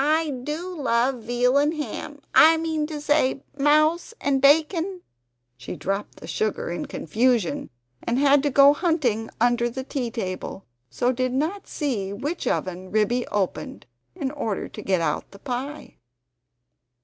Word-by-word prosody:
I 310 +1 +2
do 295 +7 -4
love 245 0 +1
veal 245 +4 +2
and 295 +3 +1
ham 300 -1 -6
I 320 +1 +7
mean 320 -2 -1
to 305 -1 -5
say 290 -2 +1
mouse 305 +8 +2
and 275 -1 +1
bacon 325 +6 +3 0.2
" 120 0 -51
She 130 - -6
dropped 195 +2 -3
the - - -11
sugar 195 +4 -2
in 175 - -4
confusion, 230 +2 0 0.3
and 235 - -1
had 285 0 +5
to 290 - +1
go 280 +1 +7
hunting 285 - 0
under 240 +1 +2
the 260 +3 -5
tea 260 -2 -3
table, 190 -4 -5 0.2
so 245 - +1
did 255 0 -1
not 320 +9 -2
see 230 - -2
which 295 +12 -4
oven 185 0 -2
Ribby 220 +4 +1
opened 195 -3 -3 0.3
in 265 - -3
order 225 -9 -3
to - - -9
get 185 -3 +1
out 165 - -1
the 200 - -14
pie. 265 +6 -5
260 Hz, 155 wpm, -24 LUFS, 220-300 Hz, 0.3 s, I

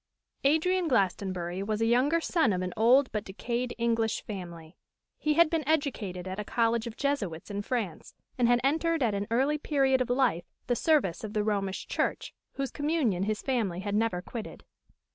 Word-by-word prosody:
_ - - +7
ADRIAN 360 +4 +2
GLASTONBURY 185 - 0
was 210 +1 -2
a 225 - +2
younger 255 +8 +3
son 320 - +2
of 185 0 -1
an 180 - -4
old 250 +5 +4
but 210 -2 -2
decayed 235 +5 -3
English 230 -2 0
family. 170 -5 -8 0.4
He 305 -1 +1
had 340 +1 +6
been 325 0 0
educated 225 - -1
at 185 +2 -5
a - - -2
college 230 +1 +1
of 230 - -8
Jesuits 210 - -2
in 200 0 -2
France, 205 -8 -4 0.2
and 245 -2 +2
had 240 0 +4
entered 320 +2 +1
at 225 -4 +1
an 200 0 -2
early 270 +6 +1
period 270 -4 +2
of 250 - -1
life 245 -10 +1 0.2
the 245 - +1
service 245 - +1
of 215 -1 -5
the 210 -2 +1
Romish 200 -2 -2
Church, - - -2 0.2
whose 275 -1 -3
communion 290 - 0
his 215 0 -2
family 215 -9 -1
had 200 0 -3
never 210 -4 0
quitted. 225 +1 -7
230 Hz, 185 wpm, -29 LUFS, 200-275 Hz, 0.4 s, _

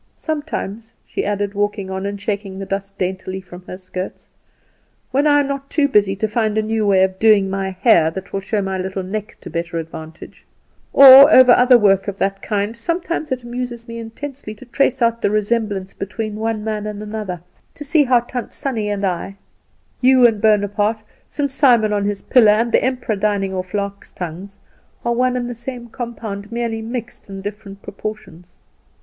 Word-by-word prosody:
Sometimes," 230 -8 -4
she - - -3
added, 205 0 -2
walking 205 -1 -2
on, 190 +1 -3
and 200 0 -5
shaking 200 -2 -4
the 195 - -5
dust 195 0 -5
daintily 185 0 -3
from 180 -1 -12
her 185 - -7
skirts, 185 0 -7 0.8
"when 280 +3 +2
I 290 -1 +5
am 280 - -2
not 275 0 -5
too 295 -2 +2
busy 205 -6 +2
trying 195 - -21
to 220 - +2
find 220 -2 0
a 220 - +2
new 220 -1 -1
way 190 -2 +4
of 190 0 -1
doing 210 -3 +4
my 195 0 -2
hair 185 -4 +3
that 190 +4 -8
will 195 - 0
show 200 +1 -2
my 190 -1 -3
little 190 +1 -3
neck 210 +3 -5
to - - -9
better 170 0 -3
advantage, 160 -1 -9 0.5
or 275 +2 +10
over 255 -3 +8
other 250 0 +6
work 195 -3 +3
of 200 -1 -4
that 195 0 -1
kind, 205 +1 -2
sometimes 335 +3 -3
it 255 -1 -2
amuses 240 -1 -6
me 230 0 -7
intensely 230 0 -8
to 235 - -14
trace 260 0 +1
out 230 0 +1
the - - +2
resemblance 210 -2 -1
between 210 +2 -5
one 220 -1 -2
man 215 -1 -3
and 210 0 -6
another: 210 -4 -5 0.4
to 295 - -8
see 295 +1 +3
how 245 -2 +4
Tant 245 0 -6
Sannie 225 -6 -2
and 205 -1 -1
I, 185 +1 -3 0.7
you 255 -1 +6
and 220 -3 +3
Bonaparte, 210 0 +1 0.2
St. 285 -2 -2
Simon 240 -6 +4
on 205 -1 0
his 205 -1 -3
pillow, 220 -5 +5
and 230 +2 0
the - - +3
emperor 250 -4 -1
dining 200 -1 -1
off 185 +1 -4
larks' 200 0 -4
tongues, 180 +3 -7 0.5
are 235 - +1
one 250 +1 +1
and 245 -1 -3
the 245 - -4
same 240 0 -7
compound, 220 -4 -6
merely 230 -1 -2
mixed 230 -2 -7
in 195 0 -7
different 200 -1 -8
proportions. 195 -5 -8
210 Hz, 190 wpm, -19 LUFS, 195-240 Hz, 0.8 s, or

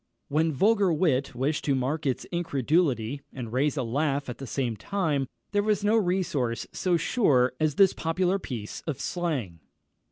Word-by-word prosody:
When 160 +3 +2
vulgar 200 - +3
wit 145 -6 +1
wished 140 +5 -1
to 140 - +2
mark 140 +4 -1
its 130 - -1
incredulity, 145 -6 0
and 120 -4 -7
raise 145 +4 +1
a 130 - 0
laugh 140 +3 -1
at 120 - -6
the 135 - -6
same 120 -2 -1
time, 150 - -1 0.2
there 205 -1 +2
was 210 -1 +1
no 210 +2 +3
resource 175 - 0
so 180 -2 +1
sure 140 - +2
as 155 -2 +1
this 195 0 +5
popular 180 +4 0
piece 115 - -6
of 150 -5 -3
slang. 140 - -2
150 Hz, 165 wpm, -27 LUFS, 130-180 Hz, 0.2 s, this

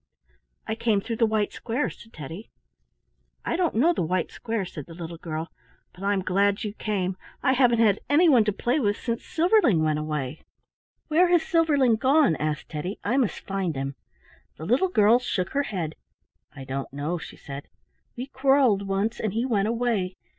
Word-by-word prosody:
"I - - -2
came 220 -2 +1
through 225 +3 -4
the 230 - +3
white 215 -1 0
square," 245 +5 -2
said 225 - -15
Teddy. 165 +6 -9 1.0
"I - - 0
don't 350 -1 0
know 315 +10 +4
the - - -2
white 180 +1 -1
square," 225 -4 -3
said 150 -5 -8
the 165 - -11
little 170 -1 -7
girl, 160 0 -5 0.4
"but 185 - -12
I'm 200 -1 +1
glad 200 +2 +1
you 210 -2 -4
came. 190 -4 -2 0.3
I 260 - +4
haven't 235 -5 +4
anyone 290 -5 +5
to 210 - +2
play 245 +8 0
with 205 -6 +1
since 235 -1 -3
Silverling 320 - +3
went 155 -1 +1
away." 150 -2 -4 0.7
"Where 335 +3 +4
has 345 -2 +3
Silverling 290 -9 +3
gone?" 265 - +4
asked 150 -1 -3
Teddy. 165 +6 -4
"I 235 +5 0
must 250 -7 0
find 190 -5 -2
him." 135 +1 -3 0.6
The 160 - -7
little 255 - +2
girl 220 - +5
shook 190 -7 -2
her 280 - +1
head. 170 -7 -3 0.6
"I 135 - -8
don't 135 +1 -5
know," 150 +5 -3
she - - -10
said. 140 -1 -8 0.5
"We 250 - -3
quarrelled 265 -7 +2
once 200 +4 -1
and 215 -3 -2
he 230 +3 0
went 210 -5 +1
away. 225 -6 0
210 Hz, 180 wpm, -25 LUFS, 175-250 Hz, 1.0 s, anyone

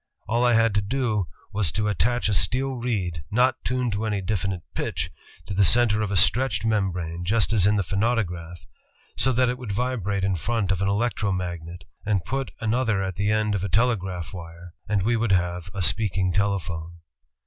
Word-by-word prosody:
All 115 +4 +1
I 120 -1 +4
had 115 -1 +3
to 105 - +2
do 110 -3 -1 0.3
was 100 -6 +1
to 105 0 0
attach 120 +4 +1
a 105 - +1
steel 130 +7 +1
reed, 100 - -2
not 125 +4 +2
tuned 125 -3 0
to 105 +2 -2
any 105 -2 0
definite 95 -2 -2
pitch, - - -3 0.3
to - - -5
the 100 +1 +3
center 110 +1 +4
of 105 - -1
a 100 - -1
stretched 110 +2 +3
membrane, 90 -6 -1
just 110 +4 +2
as 100 -3 +4
in 105 - +3
the 100 - +1
phonautograph, 90 -4 -2 0.5
so 130 - +2
that 125 0 +3
it 125 +1 -2
would 120 -5 -5
vibrate 100 -4 -1
in 95 -1 +1
front 110 +1 -1
of 95 -1 0
an 100 - +1
electromagnet, 90 -5 -2 0.2
and 100 -5 0
put 135 0 -2
another 110 -3 +1
at 95 -2 -3
the 100 +3 0
end 110 -1 +1
of 95 -2 -1
a 100 - -2
telegraph 95 -7 0
wire, 85 -1 -10 0.2
and 100 -3 +1
we 120 +4 +2
would 115 -3 +1
have... 90 -1 0
a 95 -1 -2
speaking 95 0 +1
telephone." 90 -4 -1
100 Hz, 190 wpm, -25 LUFS, 90-115 Hz, 0.5 s, I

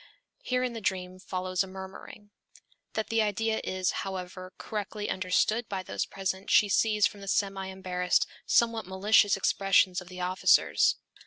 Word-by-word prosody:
Here 250 0 -1
in 250 -1 -2
the 225 - -6
dream 185 -2 -3
follows 185 0 -2
a - - -8
murmuring. 190 +2 -10 0.6
That 220 - -3
the 225 0 +2
idea 220 +1 0
is, 185 -1 -1
however, 185 -1 -6
correctly 210 0 -4
understood 195 +5 0
by 190 -2 -3
those - - -3
present 190 0 -4
she 205 - +5
sees 210 0 +3
from 205 - -3
the 195 - -9
semi 195 0 -1
embarrassed, 185 -1 0 0.2
somewhat 230 -3 +2
malicious 200 +2 +3
expressions 195 -1 +2
of 180 - -13
the 180 0 -9
officers. 180 +1 +3
195 Hz, 155 wpm, -28 LUFS, 185-210 Hz, 0.6 s, she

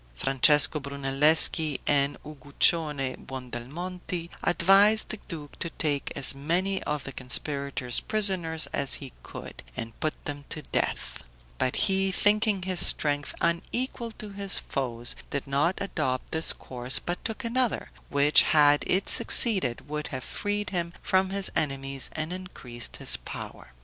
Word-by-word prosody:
Francesco 135 - +4
Brunelleschi 140 +2 +4
and 140 -1 +1
Uguccione 145 -1 +1
Buondelmonti 160 +8 -7
advised 200 +5 +4
the 215 - -5
duke 155 -6 -9
to 170 - -3
take 145 -4 -3
as 135 - +3
many 175 +7 -1
of 150 -2 -3
the 140 - -7
conspirators 135 -1 -1
prisoners 185 -7 0
as 140 -1 +6
he 135 -4 -6
could, - - -10 0.2
and 115 0 -7
put 155 - -4
them 145 -1 -5
to 155 - -6
death; - - -3 0.4
but 130 - 0
he, 195 -1 +1
thinking 205 0 +2
his 185 -1 +1
strength 145 -1 0
unequal 230 +8 -2
to 215 -1 -10
his 200 0 0
foes, 120 -3 -3
did 140 - -4
not 145 +6 0
adopt 130 -10 -3
this 160 0 +1
course, 125 0 -2
but 175 +1 -5
took 225 - -5
another, 245 +1 -1 0.2
which, 145 +1 +5
had 145 -1 +4
it 190 +2 +1
succeeded, 185 - +4
would 150 0 -4
have 130 -2 -6
freed 205 -1 -3
him 170 -2 -3
from 190 0 +1
his 195 0 -1
enemies 135 -2 0
and 155 +2 -4
increased 130 -10 -6
his - - +1
power. - - -10
150 Hz, 140 wpm, -26 LUFS, 140-185 Hz, 0.4 s, as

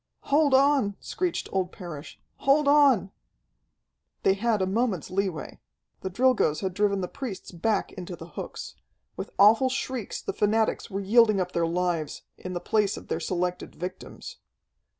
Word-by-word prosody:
"Hold 290 -2 +5
on!" 270 -7 +3
screeched 360 -1 -2
old 185 -2 -1
Parrish. 170 -5 -9 0.2
"Hold 280 +1 +3
on!" 275 -10 +5 1.1
They 190 - +5
had 215 +2 +1
a 190 - +1
moment's 195 - -1
leeway. 190 -4 -2 0.4
The 190 - -4
Drilgoes 225 -7 +2
had 190 -2 -2
driven 200 0 +1
the 180 - -2
priests 240 -5 -7
back 195 +5 0
into 180 -1 -7
the 165 0 -11
hooks. - - -7 0.4
With - - -6
awful 225 +6 +6
shrieks 255 -4 -3
the - - -4
fanatics 220 +2 +1
were 195 -1 -3
yielding 215 0 +4
up 180 -1 -1
their 170 -1 +1
lives, 170 -3 -1
in 185 - -7
the 175 - -2
place 210 +1 +1
of - - -11
their - - -1
selected 180 -1 -3
victims. 180 +2 -7
200 Hz, 155 wpm, -27 LUFS, 180-235 Hz, 1.1 s, awful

